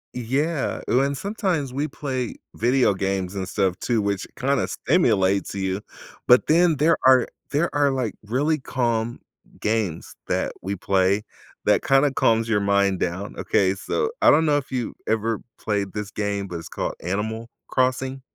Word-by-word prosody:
Yeah, 135 +6 -1
ooh 125 - +4
and 140 0 0
sometimes 185 - -2
we 145 +3 -1
play 130 -4 -4 0.2
video 120 -2 +3
games 95 -1 -2
and 95 -1 -3
stuff 95 -2 0
too, 120 -3 0
which 100 -1 -1
kinda 140 +2 0
stimulates 100 - +1
you. 95 0 -2 0.5
But 125 +1 +6
then 170 +1 +4
there 155 +3 +3
are 130 -2 +6 0.2
there 155 +4 0
are 145 -1 +4
like, 130 -4 -1
really 145 +8 +1
calm 120 -3 -1 0.4
games 105 -6 -2
that - - 0
we 100 +2 -3
play 95 +2 +1 0.4
that - - +3
kinda 135 +1 +4
calms 115 -3 +2
your 110 -2 +2
mind 100 -1 +2
down, 90 +4 -3
okay? 95 -1 +2
So, 445 - -1
I - - +7
don't 160 +2 +5
know 150 -2 +3
if 140 -2 -5
you 125 -3 -2
ever 110 0 0 0.2
played 100 -3 -2
this 105 -1 -5
game, 100 -2 -2
but 85 -2 -5
it's 80 - -10
called - - -3
Animal 110 +6 -3 0.2
Crossing. 130 +1 0
115 Hz, 165 wpm, -23 LUFS, 100-135 Hz, 0.5 s, I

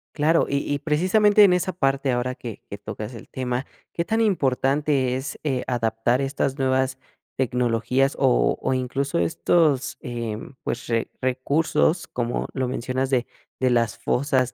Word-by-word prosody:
Claro, 160 +2 +3
y 140 - 0
y 145 - +1
precisamente 190 +8 +4
en 195 -3 +6
esa 180 +1 0
parte 135 -4 +1
ahora 125 +1 -1
que 115 -4 -8
que 100 - -6
tocas 105 +3 -7
el 115 - -11
tema, 125 0 -3 0.3
¿qué 170 - -1
tan 225 +4 +1
importante 140 - +1
es, 130 +2 -5
eh, 135 -4 -1
adaptar 120 +1 0
estas 135 0 -1
nuevas 130 0 +1 0.4
tecnologías 125 +2 +1
o - - +3
o - - 0
incluso 135 +2 -1
estos, 130 - +2
eh, 115 -3 -4 0.2
pues, 120 - -4
re 115 -1 -1
recursos, 150 +6 +1
como 120 -1 -2
lo 130 -1 -1
mencionas, 130 +2 -2
de 125 -3 +1 0.3
de 130 -1 +2
las 115 -3 +1
fosas, 130 -1 0
130 Hz, 155 wpm, -24 LUFS, 120-145 Hz, 0.4 s, en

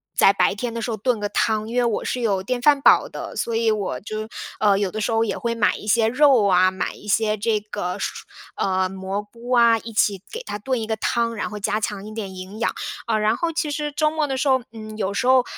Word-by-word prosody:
在 - - +6
白 200 - +2
天 230 +3 -4
的 230 - -4
时 235 - -3
候 225 - -1
炖 230 +2 0
个 205 - -1
汤， 215 +1 0
因 230 - -6
为 250 - +3
我 230 -3 -1
是 250 - -2
有 200 -5 +1
电 245 +5 -2
饭 285 +1 +4
煲 - - +5
的， - - -7
所 230 - -2
以 225 0 +2
我 210 -3 -1
就 215 +1 -6 0.3
呃 200 -2 +4
有 200 -2 0
的 215 +4 -4
时 230 - 0
候 225 0 +2
也 - - -2
会 235 -1 -1
买 210 -3 +2
一 - - -9
些 220 +1 +3
肉 255 -2 +4
啊， 185 -1 +4
买 190 - -3
一 - - -15
些 215 +1 +2
这 215 +1 0
个 205 -3 -4
蔬 - - -12
蔬 - - -4 0.3
呃 190 -1 +1
蘑 190 +1 -4
菇 230 +4 -11
啊， 235 -2 +5
一 230 +1 -8
起 205 -3 +1
给 470 - -5
它 - - -4
炖 245 +3 -2
一 220 - -4
个 220 - 0
汤， 230 +2 0
然 - - -3
后 210 - -6
加 210 +1 -1
强 205 -1 -3
一 215 - -8
点 205 -4 -5
营 185 +3 -9
养。 230 - 0 0.3
呃 220 -2 +1
然 215 +1 +2
后 335 +6 -1
其 315 -2 -2
实 295 0 -2
周 305 +1 +2
末 310 0 0
的 270 -2 -2
时 275 - 0
候， 260 -1 +4
嗯 215 -1 -9
有 200 -2 -1
时 245 +5 -1
候 260 -1 +6
220 Hz, 290 characters per minute, -22 LUFS, 205-240 Hz, 0.3 s, 在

